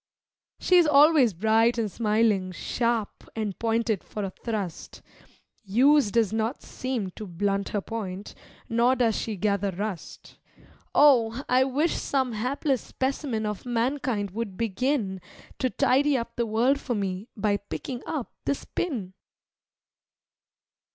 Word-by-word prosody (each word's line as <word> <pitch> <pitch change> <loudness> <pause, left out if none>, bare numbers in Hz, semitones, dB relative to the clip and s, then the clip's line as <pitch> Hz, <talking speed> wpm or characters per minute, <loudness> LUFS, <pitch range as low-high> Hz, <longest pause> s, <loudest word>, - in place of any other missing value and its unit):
She 365 - +4
is 345 -3 +5
always 290 - +5
bright 225 +5 +3
and 220 -3 -1
smiling, 210 -4 +1
sharp 230 +2 -2
and 215 -4 -3
pointed 225 -3 0
for 210 - -6
a 195 - -3
thrust. 205 -5 -5 0.6
Use 255 +5 +4
does 220 -1 +1
not 225 +4 -2
seem 245 -7 -4
to 210 +3 -8
blunt 195 +3 -1
her 205 - -1
point, 200 -3 -6 0.3
nor 235 +3 +3
does 235 -4 +2
she 220 - -3
gather 200 0 0
rust, 195 0 -6 0.6
Oh! 255 -3 +5
I 255 +1 +4
wish 290 +5 +1
some 265 -3 0
hapless 255 +4 -1
specimen 260 -4 -2
of 210 -2 -4
mankind 240 -4 -1
would 205 -2 -5
begin 225 -3 -1 0.4
To 255 - +1
tidy 275 +3 +2
up 235 -1 -5
the 235 -1 -1
world 240 +6 +2
for 245 -3 -3
me, 195 +1 -3
by 205 0 +1
picking 240 +5 -6
up 290 -7 -4
this 280 - -2
pin! 230 - -3
230 Hz, 135 wpm, -26 LUFS, 205-255 Hz, 0.6 s, is